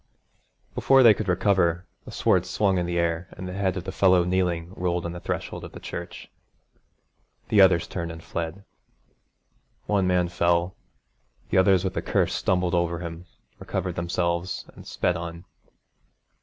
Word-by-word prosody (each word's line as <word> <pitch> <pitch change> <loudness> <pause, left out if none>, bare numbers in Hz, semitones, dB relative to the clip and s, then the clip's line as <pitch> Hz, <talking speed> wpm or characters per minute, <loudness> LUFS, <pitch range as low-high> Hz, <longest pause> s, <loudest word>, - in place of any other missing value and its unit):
Before 135 -1 +5
they 115 -3 +9
could 105 0 -5
recover, 90 -2 +2 0.2
the - - -9
sword 90 0 +2
swung 95 0 +1
in 85 0 -2
air, 85 0 -1
and 95 - -7
the 90 - -6
head 95 -1 -1
of 90 - -4
the 95 - -5
fellow 95 -2 +4
kneeling 90 -1 -1
rolled 90 -1 -1
on 85 - -3
the 85 - -7
threshold - - -4
of - - -9
the - - -9
church. - - -7 1.2
The 105 - +5
others 95 -3 +5
turned 85 -2 -4
and 80 0 -10
fled. 85 +4 -5 1.2
One 100 -3 +1
man 90 -1 +2
fell, 85 +1 +1 0.8
the - - +4
others 95 -1 +4
with 95 -1 -2
a - - +1
curse - - 0
stumbled 90 -1 0
over 85 -1 +1
him, 85 +1 -7 0.3
recovered 90 -1 -3
themselves, 85 +1 -2
and - - -13
sped 90 - 0
on. 85 +1 -6
90 Hz, 160 wpm, -25 LUFS, 85-95 Hz, 1.2 s, they